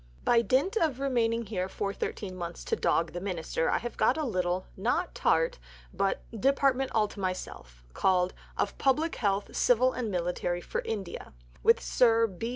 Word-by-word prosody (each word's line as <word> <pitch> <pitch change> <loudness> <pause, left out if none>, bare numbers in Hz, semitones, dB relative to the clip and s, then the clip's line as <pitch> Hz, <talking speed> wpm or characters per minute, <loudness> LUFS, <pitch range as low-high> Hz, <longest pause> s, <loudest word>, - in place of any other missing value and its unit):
"By 235 -1 +4
dint 270 - +1
of 305 - +1
remaining 235 -4 +1
here 185 -3 -3
for 200 +1 -3
13 190 -2 -4
months 170 -1 -6
to - - 0
dog 165 -1 +1
the 175 - -4
Minister 170 -4 -1
I - - +2
have 240 0 -6
got 260 - +3
a 310 - -1
little 185 -5 -1
(not 245 - 0
tart, - - +1 0.3
but) 195 +1 0
Department 270 +3 +2
all 215 -1 +3
to - - -11
myself, 185 - -5
called 185 -1 +2 0.2
'Of - - -1
Public 305 +5 +1
Health, 200 -2 -1
Civil 250 +1 +3
and 240 -3 -3
Military, 175 -1 -1
for - - -3
India,' 200 -5 -5 0.3
with 230 - +5
Sir 230 -2 +4
B. 220 +2 -5
220 Hz, 170 wpm, -29 LUFS, 185-255 Hz, 0.3 s, with